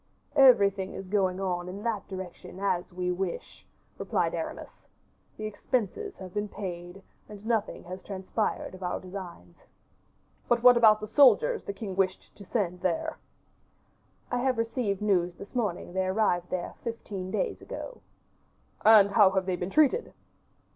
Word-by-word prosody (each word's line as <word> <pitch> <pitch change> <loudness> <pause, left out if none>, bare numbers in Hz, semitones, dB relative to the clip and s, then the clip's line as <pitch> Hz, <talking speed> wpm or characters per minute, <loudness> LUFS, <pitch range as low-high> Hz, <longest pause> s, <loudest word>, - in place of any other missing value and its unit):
"Everything 200 -8 +5
is 195 - -7
going 190 -2 +1
on 180 -2 -2
in 200 +3 -7
that 225 -4 -2
direction 190 -1 -8
as 185 -3 -1
we 180 0 -2
wish," 180 0 -5 0.3
replied - - 0
Aramis; - - -6 0.5
"the 215 - -5
expenses 250 - -2
have 185 -2 -9
been 210 0 -1
paid, 180 -1 -7 0.3
and 210 0 -11
nothing 225 -3 -1
has 185 +1 -8
transpired 195 +2 -3
of 185 - -11
our 180 - -2
designs." 180 - -10 0.9
"But 240 0 +2
what 250 0 +9
about 220 -3 +6
the 215 - -5
soldiers 435 - +5
the - - -3
king 200 -1 -6
wished 190 -1 -1
to 205 - -12
send 180 -4 -2
there?" 180 -3 -1 1.1
"I 245 - 0
have 255 -1 +1
received 230 -3 -1
news 180 -4 +1
this 200 - -11
morning 210 -8 -2
they 190 0 0
arrived 185 -3 +1
there 180 -1 -3
fifteen 205 -5 -5
days - - -2
ago." - - -8 0.8
"And 210 -2 +7
how 200 -2 +6
have 190 -1 0
they 185 -1 0
been 180 +1 -4
treated?" 310 - +2
195 Hz, 155 wpm, -28 LUFS, 185-225 Hz, 1.1 s, what